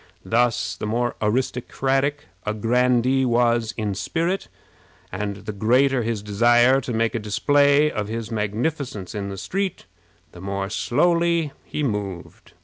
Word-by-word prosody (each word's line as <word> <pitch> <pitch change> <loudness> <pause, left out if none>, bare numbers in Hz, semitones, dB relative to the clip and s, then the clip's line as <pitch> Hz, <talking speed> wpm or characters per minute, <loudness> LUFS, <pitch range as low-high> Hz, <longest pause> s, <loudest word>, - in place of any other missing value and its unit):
Thus, 115 -5 +1
the 105 - -5
more 120 +3 -1
aristocratic 135 +5 0 0.2
a 105 +1 -2
grandee 125 +3 +2
was 120 -2 +2
in 105 -3 -1
spirit, 170 - -2 0.6
and 100 +1 -4
the - - -3
greater 125 +6 +2
his 110 -2 -2
desire 120 +5 +4
to 125 - -5
make 115 0 0
a 115 - -1
display 145 +7 +3
of 105 -1 -3
his 115 0 -5
magnificence 110 - -3
in 100 -2 -4
the 100 - -6
street, 195 - -3 0.5
the 85 - -12
more 100 +1 -3
slowly 170 +4 +1
he 150 - -4
moved. 100 - -5
120 Hz, 140 wpm, -23 LUFS, 105-135 Hz, 0.6 s, desire